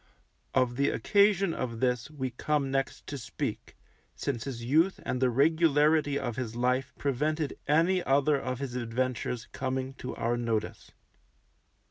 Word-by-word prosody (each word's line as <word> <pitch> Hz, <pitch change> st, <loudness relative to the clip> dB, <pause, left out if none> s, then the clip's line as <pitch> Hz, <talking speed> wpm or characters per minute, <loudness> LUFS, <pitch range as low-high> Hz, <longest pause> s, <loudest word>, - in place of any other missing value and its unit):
Of 125 Hz, -2 st, +2 dB
the 140 Hz, -, +3 dB
occasion 200 Hz, -3 st, +3 dB
of 115 Hz, -3 st, -4 dB
this 125 Hz, +1 st, 0 dB
we 130 Hz, -4 st, -4 dB
come 140 Hz, +2 st, -1 dB
next 135 Hz, 0 st, -2 dB
to 140 Hz, -, -5 dB
speak, -, -, -5 dB, 0.4 s
since 120 Hz, -5 st, -3 dB
his 120 Hz, -4 st, -5 dB
youth 160 Hz, +9 st, +3 dB
and 125 Hz, -, -2 dB
the 130 Hz, -, +4 dB
regularity 150 Hz, +1 st, +3 dB
of 120 Hz, -5 st, -3 dB
his 115 Hz, -3 st, -4 dB
life 125 Hz, +2 st, 0 dB
prevented 150 Hz, +2 st, -1 dB
any 170 Hz, +5 st, +3 dB
other 140 Hz, +1 st, +3 dB
of 130 Hz, 0 st, -3 dB
his 135 Hz, -2 st, -5 dB
adventures 125 Hz, 0 st, -2 dB
coming 130 Hz, 0 st, -3 dB
to 125 Hz, -, -5 dB
our 120 Hz, +1 st, 0 dB
notice. 115 Hz, -2 st, -2 dB
135 Hz, 145 wpm, -29 LUFS, 125-150 Hz, 0.4 s, the